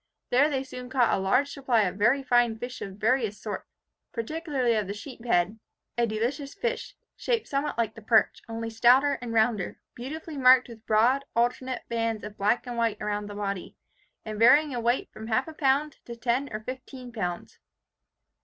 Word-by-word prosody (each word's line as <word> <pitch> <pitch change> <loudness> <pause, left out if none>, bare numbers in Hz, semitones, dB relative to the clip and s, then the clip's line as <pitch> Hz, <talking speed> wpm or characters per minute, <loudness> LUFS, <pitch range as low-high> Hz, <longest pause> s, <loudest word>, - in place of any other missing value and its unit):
There 280 +5 +5
they 270 -3 -1
soon 250 -1 -8
caught 255 -3 +3
a - - +1
large 250 +9 +2
supply 255 -5 +1
of 180 -1 -1
very 235 +7 +3
fine 240 -3 +3
fish 245 +2 -7
of 195 -1 -6
various 220 -1 +1
sorts, 210 - -5 0.4
particularly 260 0 -1
of 210 -3 0
the 200 - -4
sheephead, 225 -4 -1 0.4
a 235 0 +2
delicious 245 +6 -2
fish, 485 0 -3 0.2
shaped 470 -2 -1
somewhat 280 0 -2
like 225 -2 0
the 225 - -12
perch, 220 +1 +3
only 225 0 -4
stouter 255 +5 +4
and 240 -2 -5
rounder, 220 -4 +1
beautifully 300 +5 -7
marked 255 -1 +6
with 225 -1 -13
broad 240 +6 +3
alternate 245 +2 0
bands 230 -2 -1
of 210 0 -7
black 210 +6 +1
and 245 -1 -5
white 230 -2 0
around 205 0 -2
the 205 - -8
body, 200 -3 -4 0.5
and 215 -1 -5
varying 285 +6 +6
in 245 -2 -3
weight 240 +2 0
from 220 +1 -8
half 235 +5 +1
a 320 - -7
pound 290 0 +1
to 235 - -7
ten 245 +4 0
or 215 0 -4
fifteen 255 +1 -8
pounds. 180 -6 -4
240 Hz, 180 wpm, -27 LUFS, 220-265 Hz, 0.5 s, marked